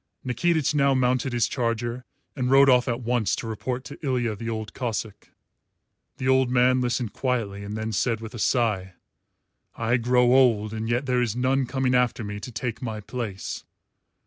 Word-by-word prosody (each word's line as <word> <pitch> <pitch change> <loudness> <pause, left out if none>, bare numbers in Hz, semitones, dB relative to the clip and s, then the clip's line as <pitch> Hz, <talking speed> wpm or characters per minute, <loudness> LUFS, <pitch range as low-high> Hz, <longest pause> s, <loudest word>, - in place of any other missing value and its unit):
Nikitich 155 +4 +1
now 140 -2 +3
mounted 130 +1 +1
his 120 -2 +1
charger 120 0 -2 0.3
and 125 -3 -1
rode 135 0 +7
off 125 -1 +4
at 120 0 -1
once 120 -2 +1
to - - -6
report 125 +3 -4
to 145 +2 -11
Ilya 125 -5 0
the 115 +3 -5
Old 110 -1 -4
Cossáck. 110 -4 -4 0.9
The 130 - -3
old 130 -1 +4
man 125 +1 +3
listened 120 -2 -1
quietly 115 -6 -2
and 105 +2 -5
then 110 +1 -3
said 115 +2 0
with 110 +1 -8
a 120 - -7
sigh, 105 -7 0 0.8
"I 115 +2 +1
grow 125 +1 +3
old, 115 -5 +4
and 110 +1 -3
yet 120 +3 0
there 125 -1 +1
is 115 -3 -1
none 130 +1 +1
coming 130 0 0
after 125 -1 +2
me 105 0 -5
to 125 - -8
take 115 0 -4
my 110 -4 -4
place." 105 -3 -5
120 Hz, 180 wpm, -25 LUFS, 110-130 Hz, 0.9 s, rode